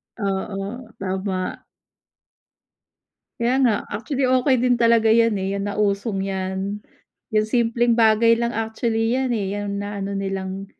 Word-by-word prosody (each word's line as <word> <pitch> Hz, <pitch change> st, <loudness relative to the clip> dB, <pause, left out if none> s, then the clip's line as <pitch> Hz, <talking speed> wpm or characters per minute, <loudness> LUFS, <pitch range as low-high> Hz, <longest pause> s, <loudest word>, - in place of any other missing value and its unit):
Oo, 200 Hz, +3 st, -4 dB
tama. 190 Hz, -1 st, -3 dB, 1.8 s
Kaya 235 Hz, +2 st, +1 dB
nga. 245 Hz, -4 st, +4 dB, 0.2 s
Actually, 260 Hz, +6 st, -1 dB
okey 255 Hz, +1 st, +3 dB
din 245 Hz, 0 st, +3 dB
talaga 230 Hz, -1 st, +5 dB
'yan 230 Hz, -2 st, +3 dB
eh, 190 Hz, 0 st, -2 dB
yan 200 Hz, +1 st, -2 dB
nausong 200 Hz, -1 st, -1 dB
'yan. 190 Hz, +1 st, -3 dB, 0.5 s
Yung 215 Hz, 0 st, +2 dB
simpleng 235 Hz, +1 st, +2 dB
bagay 230 Hz, 0 st, +5 dB
lang 235 Hz, +1 st, 0 dB
actually 225 Hz, +1 st, -1 dB
'yan 260 Hz, 0 st, 0 dB
eh, 200 Hz, -5 st, -1 dB
'yan 205 Hz, -1 st, -3 dB
na-ano 200 Hz, -1 st, -4 dB
nilang 195 Hz, 0 st, -4 dB
215 Hz, 130 wpm, -22 LUFS, 195-235 Hz, 1.8 s, talaga